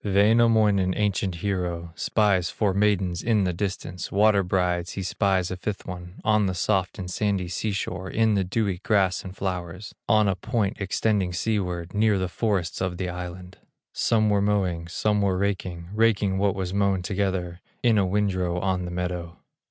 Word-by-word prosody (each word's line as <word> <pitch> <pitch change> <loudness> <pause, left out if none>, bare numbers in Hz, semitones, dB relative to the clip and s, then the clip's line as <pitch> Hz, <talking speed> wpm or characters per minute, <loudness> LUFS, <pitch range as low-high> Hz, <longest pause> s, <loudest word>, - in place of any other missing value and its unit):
Wainamoinen, 105 -2 +3
ancient 100 -3 0
hero, 90 -4 -2
Spies 95 -5 +1
four 100 +2 0
maidens 95 -3 +1
in 110 -3 +2
the 90 -1 0
distance, 90 -2 -4
Water 105 0 +4
brides, 90 -1 0
he 95 - -4
spies 95 -1 0
a - - -2
fifth 100 +2 -4
one, 90 0 -8
On 105 -2 +3
the 95 - -2
soft 95 0 0
and 95 - -5
sandy 95 0 -1
sea 105 +4 -2
shore, 95 -1 -4
In 110 +1 +2
the 100 -2 +2
dewy 95 -1 -1
grass 100 -2 +1
and 95 0 -9
flowers, 90 +1 -4 0.2
On 110 -1 +4
a 95 - +2
point 105 +1 -2
extending 100 -1 0
seaward, 90 -4 -2
Near 105 -1 +3
the 95 -1 -1
forests 95 -5 -1
of 95 -2 -2
the 90 -1 -2
island. 90 +1 -7 0.3
Some 110 -2 +2
were 100 -1 +3
mowing, 95 -5 0
some 105 +4 0
were 95 -2 +1
raking, 95 -3 -2
Raking 105 -3 +2
what 100 -1 +2
was 95 -1 -3
mown 100 -2 +1
together, 95 -2 -2 0.2
In 115 -3 +4
a 100 - +2
windrow 95 -3 0
on 95 -1 -1
the - - -4
meadow. 90 -1 -4
95 Hz, 175 wpm, -25 LUFS, 90-105 Hz, 0.3 s, Water